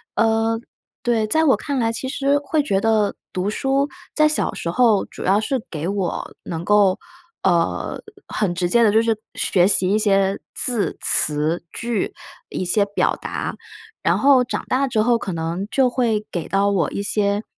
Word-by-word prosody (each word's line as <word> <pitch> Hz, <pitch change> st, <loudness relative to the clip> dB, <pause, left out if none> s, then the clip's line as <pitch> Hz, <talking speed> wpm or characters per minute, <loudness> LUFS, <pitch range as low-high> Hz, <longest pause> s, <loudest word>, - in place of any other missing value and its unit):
呃， 225 Hz, 0 st, +1 dB, 0.4 s
对， 230 Hz, -3 st, +1 dB
在 315 Hz, +9 st, +2 dB
我 285 Hz, -4 st, +4 dB
看 285 Hz, -4 st, -3 dB
来， 225 Hz, -1 st, +1 dB
其 230 Hz, +3 st, -4 dB
实 280 Hz, +1 st, +1 dB
会 300 Hz, +2 st, 0 dB
觉 200 Hz, -9 st, 0 dB
得 215 Hz, -1 st, +1 dB, 0.2 s
读 185 Hz, +2 st, -1 dB
书 270 Hz, +5 st, 0 dB, 0.2 s
在 305 Hz, 0 st, +4 dB
小 305 Hz, -, 0 dB
时 170 Hz, -, -4 dB
候 220 Hz, +1 st, +3 dB
主 -, -, -10 dB
要 195 Hz, +3 st, +3 dB
是 265 Hz, +3 st, -1 dB
给 160 Hz, +1 st, -4 dB
我 195 Hz, -3 st, -3 dB
能 165 Hz, 0 st, -5 dB
够， 205 Hz, -2 st, +3 dB, 0.4 s
呃， 175 Hz, -3 st, 0 dB, 0.3 s
很 200 Hz, -5 st, -1 dB
直 175 Hz, 0 st, 0 dB
接 235 Hz, +4 st, +4 dB
地 215 Hz, -, +4 dB
就 220 Hz, -, +4 dB
是 225 Hz, -1 st, +1 dB, 0.2 s
学 185 Hz, -2 st, +2 dB
习 190 Hz, -2 st, +4 dB
一 215 Hz, -, +2 dB
些 195 Hz, -2 st, +2 dB, 0.2 s
字、 240 Hz, -5 st, +2 dB
词、 155 Hz, +3 st, +3 dB
句， 235 Hz, -3 st, -3 dB, 0.4 s
一 185 Hz, -, -3 dB
些 200 Hz, +4 st, +2 dB
表 -, -, +2 dB
达， -, -, -5 dB, 0.5 s
然 -, -, +2 dB
后 270 Hz, -2 st, +5 dB
长 245 Hz, -, -4 dB
大 270 Hz, +2 st, +1 dB
之 220 Hz, -4 st, +1 dB
后 235 Hz, 0 st, +2 dB
可 190 Hz, -, -4 dB
能 165 Hz, +4 st, -3 dB
就 265 Hz, -2 st, +3 dB
会 235 Hz, -4 st, 0 dB
给 170 Hz, -3 st, -4 dB
到 200 Hz, +1 st, +2 dB
我 185 Hz, -6 st, +1 dB
一 200 Hz, -, -4 dB
些， 205 Hz, 0 st, 0 dB
215 Hz, 195 characters per minute, -21 LUFS, 190-245 Hz, 0.5 s, 后